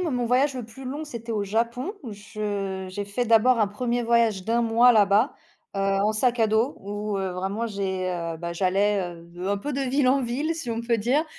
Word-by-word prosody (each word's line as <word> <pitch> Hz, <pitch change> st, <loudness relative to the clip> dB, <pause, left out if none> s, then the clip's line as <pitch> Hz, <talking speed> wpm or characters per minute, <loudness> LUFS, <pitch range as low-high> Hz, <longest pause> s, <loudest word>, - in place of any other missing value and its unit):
mais 350 Hz, -3 st, -1 dB
mon 245 Hz, -2 st, -1 dB
voyage 265 Hz, +4 st, +2 dB
le 250 Hz, -2 st, -5 dB
plus 230 Hz, +4 st, -12 dB
long, 285 Hz, +5 st, -4 dB
c'était 235 Hz, -5 st, -6 dB
au 210 Hz, -2 st, 0 dB
Japon. 235 Hz, -, -1 dB, 0.2 s
Je 200 Hz, -2 st, -4 dB
j'ai 200 Hz, +2 st, -4 dB
fait 200 Hz, +5 st, -2 dB
d'abord 230 Hz, +2 st, +4 dB
un 215 Hz, -, +3 dB
1er 240 Hz, +4 st, -2 dB
voyage 230 Hz, -4 st, +2 dB
d' 225 Hz, -, -4 dB
1 235 Hz, +1 st, +3 dB
mois 235 Hz, +2 st, +5 dB
là 215 Hz, -3 st, +6 dB
bas, 205 Hz, +7 st, +2 dB, 0.4 s
heu, -, -, 0 dB, 0.2 s
en 210 Hz, +2 st, +2 dB
sac 240 Hz, +3 st, +1 dB
à 225 Hz, -, +4 dB
dos, 220 Hz, +6 st, +1 dB
où, 205 Hz, +1 st, -3 dB
heu, 190 Hz, -1 st, -2 dB
vraiment 195 Hz, +5 st, -2 dB
j'ai, 190 Hz, -3 st, -2 dB
heu, 170 Hz, -2 st, -3 dB
bah, 170 Hz, +1 st, -5 dB
j'allais, 195 Hz, +3 st, +1 dB, 0.4 s
heu, 180 Hz, +2 st, -4 dB
un 200 Hz, 0 st, 0 dB
peu 290 Hz, +9 st, -4 dB
de 275 Hz, -, -2 dB
ville 270 Hz, 0 st, +2 dB
en 270 Hz, +1 st, +3 dB
ville, 275 Hz, +7 st, -1 dB
si 325 Hz, -7 st, -4 dB
on 230 Hz, 0 st, -2 dB
peut 235 Hz, 0 st, +1 dB
dire, 250 Hz, +8 st, +1 dB
225 Hz, 230 wpm, -25 LUFS, 200-245 Hz, 0.4 s, là